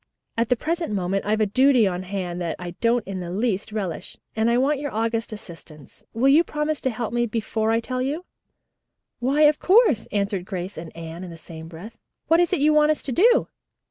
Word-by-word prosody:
At 230 0 0
the 250 - +4
present 330 +3 -2
moment 195 0 -1
I've 215 +1 +1
a - - +4
duty 255 +2 +4
on 180 -2 -1
hand 180 -2 -4
that 170 -2 -2
I 175 -1 -6
don't 235 -1 +2
in 195 -1 -5
the 175 -1 -5
least 210 +2 -1
relish, 195 -6 -5 0.2
and 225 +1 +2
I 235 - +3
want 275 +3 +2
your 290 -1 -4
august 230 +1 -1
assistance. 165 -8 -12
Will 240 +4 +1
you 305 +5 +6
promise 300 -1 -2
to 260 - 0
help 230 -1 -4 0.2
before 220 0 -1
I 225 0 +3
tell 255 +2 -3
you?" 295 +7 -2 0.9
"Why, 270 +5 +1
of 300 0 +5
course," 375 - +4
answered 200 -2 -1
Grace 185 0 -5
and 165 -1 -8
Anne 165 +2 -7
in 180 - -7
the 165 - -10
same 160 0 -10
breath. 175 +7 -11 0.3
"What 330 +1 +5
is 350 -1 +2
it - - +2
you 305 +1 +4
want 300 0 +4
us 310 - 0
to 270 - -4
do?" 465 - +4
225 Hz, 215 wpm, -23 LUFS, 185-275 Hz, 0.9 s, you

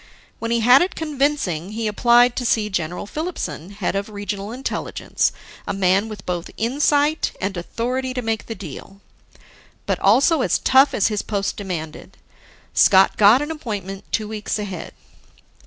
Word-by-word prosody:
When 230 - -3
he 235 0 +1
had 250 +4 +7
it 360 - -1
convincing, 275 - -1
he 225 +1 -3
applied 240 +3 +4
to 250 - -2
see 215 -3 +1
General 175 0 -3
Filipson, 205 - -5
head 200 -2 -3
of 200 +2 -2
Regional 205 0 -5
Intelligence, 260 +3 -2 0.4
a - - -1
man 195 +3 +2
with 210 -3 -9
both 175 -1 -3
insight 290 +5 +1
and 195 +1 -2
authority 250 +8 -3
to 250 - -2
make 225 -1 -2
the 225 - -5
deal 195 0 -10 0.9
but - - -1
also 265 - +4
as - - +2
tough 265 +2 +4
as 205 - +2
his 210 -2 -1
post 200 -2 -2
demanded. 165 -6 -6 0.6
Scott 190 0 +5
got 215 +7 +6
an 295 - -4
appointment 205 - -5
two 215 -2 -1
weeks 215 0 -3
ahead. 195 -4 -6
215 Hz, 155 wpm, -21 LUFS, 195-255 Hz, 0.9 s, had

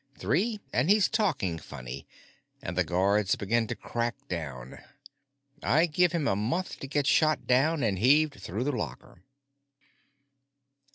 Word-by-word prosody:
Three 190 - 0
and 130 +8 +1
he's 210 0 +5
talking 145 - 0
funny 65 -4 -9 0.5
and - - -6
the - - +2
guards 95 +2 +2
begin 115 +3 0
to - - -3
crack 120 0 -3
down. 65 -8 -6 0.8
I 155 +4 +3
give 175 +1 +2
him 165 -5 -1
a 95 - +2
month 125 - -2
to 135 - -6
get 145 0 0
shot 155 +1 +3
down 140 +4 +2
and 100 -5 0
heaved 145 +1 +3
through 100 +6 -3
the 145 - 0
locker." 85 - -6
125 Hz, 145 wpm, -28 LUFS, 95-155 Hz, 0.8 s, he's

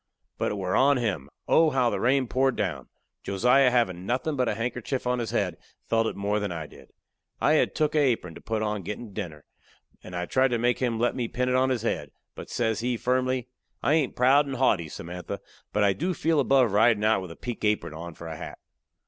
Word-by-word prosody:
But - - 0
it - - -4
were 95 -1 -1
on 140 +1 +4
him. 95 - -2 0.2
Oh, 160 -1 +5
how 130 -4 +2
the - - -2
rain 130 +2 +2
poured 130 +1 +1
down! 75 -10 -3 0.3
Josiah, 125 +7 +4
havin' 105 -8 +1
nothin' 130 +9 -1
but 125 -3 +1
a - - -1
handkerchief 125 +3 -3
on 125 0 +1
his 115 - -2
head, 90 -5 -1 0.3
felt 115 0 +2
it - - -3
more 100 +1 0
than 100 -2 -3
I 80 -2 -4
did. - - -15 0.5
I 150 - +3
had 155 - +2
took 155 -2 +1
a 155 - +3
apron 120 - +1
to - - -12
put 110 -1 -2
on 105 0 -1
a - - -6
gettin' 105 +3 -7
dinner, 85 -8 -6 0.6
and 90 - -9
I 90 0 -2
tried 130 +8 +3
to 120 -2 0
make 120 +1 +1
him 120 -3 0
let 120 +2 +1
me 120 -3 -1
pin 125 +2 -1
it 125 - +2
on 130 +1 +3
his 125 -4 -1
head. 75 -10 -2 0.2
But - - -9
says 110 -2 0
he, 120 +1 -1
firmly: 130 0 0 0.3
"I 145 - +3
hain't 155 -5 +1
proud 135 +4 +4
and 135 - -4
haughty, 100 -11 +2
Samantha, 90 +3 -6 0.3
but 105 - +1
I 100 -1 +4
do 175 - -2
feel 160 -1 +1
above 135 -4 +4
ridin' 110 +1 +4
out 110 -2 +3
with 95 - -7
a 85 - -9
pink 120 -3 -6
apron 105 -6 0
on 85 +1 -8
for 85 - -10
a 80 -1 -5
hat." - - -8
115 Hz, 235 wpm, -26 LUFS, 100-130 Hz, 0.6 s, Oh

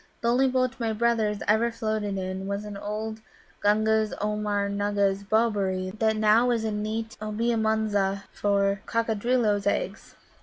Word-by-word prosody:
"The 235 - +1
only 255 +3 +4
boat 255 0 0
my 225 -2 0
brothers 220 -2 +1
ever 220 +3 +3
floated 215 -3 -2
in 190 +1 -4
was 200 +1 -3
an 210 -1 -7
old 215 +2 -5 0.4
Gunga's 215 +1 +2
Oomgar 210 -1 -1
nugga's 200 -1 0
bobberie 200 -4 0
that 220 -1 +2
now 220 +3 +4
is 235 -2 +1
a 220 - -1
nest 215 +2 -4
in 215 - -4
Obea 230 +2 0
Munza 205 -3 0
for 200 -1 +1
Coccadrilloes' 225 -2 +1
eggs." 200 0 -2
215 Hz, 150 wpm, -26 LUFS, 200-225 Hz, 0.4 s, only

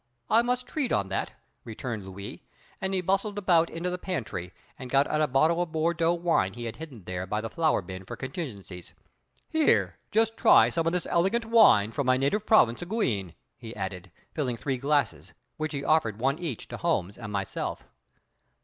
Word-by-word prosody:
I 225 - +6
must 250 +1 -1
treat 275 0 -2
on 95 -1 +1
that," 95 - -2 0.3
returned 110 -3 -6
Louis, 100 +1 -8 0.4
and 190 - -1
he 190 -1 0
bustled 195 +3 0
around 175 -4 +3
into 175 +2 -3
the 180 - -3
pantry, 115 - -4 0.3
and 130 - -7
got 140 +2 +4
out 155 - 0
a 155 - +3
bottle 155 +6 +3
of 175 -2 -3
Bordeaux 165 +1 +1
wine 170 - +1
he 120 - -6
had 115 - -5
hidden 140 - -9
there 90 +1 -5
by 105 +3 -1
the 115 +1 -5
flour 160 - +1
bin 95 +1 -8
for 95 - -7
contingencies. 115 - -7 0.5
"Here, 315 -2 +2
just 225 +1 +1
try - - +6
some 165 -1 0
of 165 - +1
this 180 - -1
elegant 195 +7 +1
wine 215 - +5
from 140 +3 -2
my 130 0 +4
native 170 +11 0
province 120 - +4
of 175 - -7
Guienne," 105 - -1 0.2
he 115 -1 -10
added, 95 -2 -5 0.2
filling 125 -6 -2
three 135 +3 -2
glasses, 145 +2 0 0.2
which 155 -1 -2
he 140 -2 -4
offered 135 -10 +2
one 135 +6 0
each 160 -10 -5
to - - -6
Holmes 95 +4 -1
and 110 -3 -8
myself. 100 -2 -3
145 Hz, 195 wpm, -27 LUFS, 110-175 Hz, 0.5 s, I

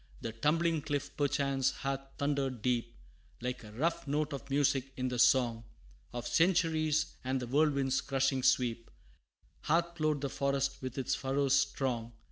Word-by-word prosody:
The 115 - -3
tumbling 155 +7 +1
cliff 145 0 -3
perchance 140 -2 +1
hath 135 0 -3 0.2
thundered 140 -5 -1
deep, 120 -2 0 0.4
Like 125 0 -4
a 105 - -11
rough 165 +6 -1
note 150 +1 0
of 140 - -7
music 135 -1 +1
in 130 0 -1
the 125 -1 -3
song 120 -3 +4 0.5
Of 120 0 -5
centuries, 160 -3 +2
and 130 +1 0
the 125 - -4
whirlwind's 140 0 +2
crushing 135 -1 0
sweep, 115 -2 +1 0.7
Hath 170 +2 +1
ploughed 155 -3 0
the 140 - -1
forest 140 0 -1
with 130 0 -5
its 130 - 0
furrows 135 0 +1
strong. 125 -4 0
135 Hz, 150 wpm, -32 LUFS, 125-145 Hz, 0.7 s, song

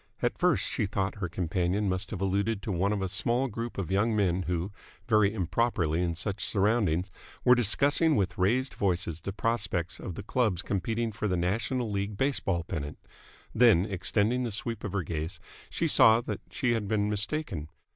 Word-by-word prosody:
At - - +1
first - - +3
she 105 - -1
thought 95 -1 -2
her 90 -3 -2
companion 90 +4 -1
must 95 0 -2
have 100 -4 -5
alluded 100 +2 0
to 105 - -3
one 95 +3 +1
of 100 -2 -1
a - - 0
small 115 +8 +1
group 115 0 -5
of 95 -2 -3
young 110 +3 +2
men 95 -3 +1
who, 90 +2 -2 0.4
very 105 -3 +4
improperly 90 -4 0
in 85 -2 -1
such 95 +3 -3
surroundings, 100 -4 +1 0.3
were 125 - +8
discussing 140 - +4
with 95 -4 0
raised 125 +9 +1
voices 90 -4 -1
the 100 - -4
prospects 95 -5 -1
of 90 - -6
the - - -6
clubs 105 -9 0
competing 110 +5 -1
for 110 +1 -3
the 90 -2 0
National 115 +8 -1
League 100 0 -2
Baseball 100 -10 0
Pennant. 75 -4 -5 0.6
Then, 110 -7 +5
extending 105 +4 +1
the 120 -2 -2
sweep 115 +2 -3
of 105 - -4
her 100 -3 0
gaze, 80 +2 -4 0.3
she - - -1
saw 110 +1 +6
that - - -5
she 125 - 0
had 110 -3 -1
been 105 0 +1
mistaken. 105 - -2
100 Hz, 185 wpm, -29 LUFS, 90-115 Hz, 0.6 s, were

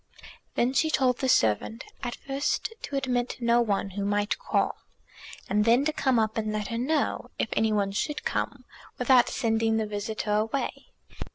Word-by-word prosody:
Then 245 +2 +2
she 295 +5 +2
told 255 -5 +2
the 265 - 0
servant, 110 - +2 0.2
at 245 -2 -3
first 280 +10 -2
to 285 - -5
admit 250 -3 -1
no 235 0 +3
one 200 -3 0
who 200 +1 -3
might 205 +1 0
call, - - 0 0.7
and 210 0 +2
then 235 +5 +4
to 310 - +1
come 265 -5 +2
up 220 -1 +1
and 215 -1 -2
let 210 -1 -3
her 230 - -2
know, 295 +4 0
if - - -1
any 220 0 +2
one 200 -2 +1
should 295 +9 -2
come, - - -2 0.3
without 255 -3 +5
sending 225 -2 +1
the 220 - 0
visitor 210 0 -3
away. 220 - -1
230 Hz, 175 wpm, -27 LUFS, 210-260 Hz, 0.7 s, without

